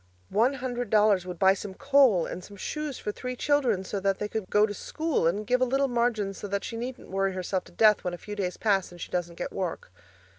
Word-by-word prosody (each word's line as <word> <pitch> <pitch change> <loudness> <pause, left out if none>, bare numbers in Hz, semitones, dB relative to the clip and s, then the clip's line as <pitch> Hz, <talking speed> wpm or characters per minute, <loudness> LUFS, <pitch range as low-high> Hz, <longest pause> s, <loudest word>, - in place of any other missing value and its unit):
One 245 +6 +3
hundred 245 -3 -3
dollars 210 -4 +4
would 180 -1 -5
buy 190 +1 +5
some 195 0 -7
coal 265 -11 +4
and 180 - -6
some 200 +1 -12
shoes 300 +4 -4
for 210 - -3
three 250 +4 -5
children 250 -8 +1
so 195 +2 -3
that 195 0 +1
they 210 - -3
could 210 -3 -4
go 210 0 +5
to 205 - -4
school, 310 - -1
and 200 +6 0
give 250 +2 +2
a - - +6
little 270 +2 +2
margin 235 -5 0
so 200 - -7
that 200 0 -2
she - - -5
needn't 245 0 -6
worry 195 0 0
herself 185 0 -2
to - - -15
death 210 +3 +4
when 180 -1 -2
a - - -11
few 210 +4 -7
days 185 -3 -2
pass 195 -5 +1
and 175 - -12
she - - -7
doesn't 175 -1 -2
get - - -4
work. 185 - -4
210 Hz, 250 wpm, -27 LUFS, 190-245 Hz, -, a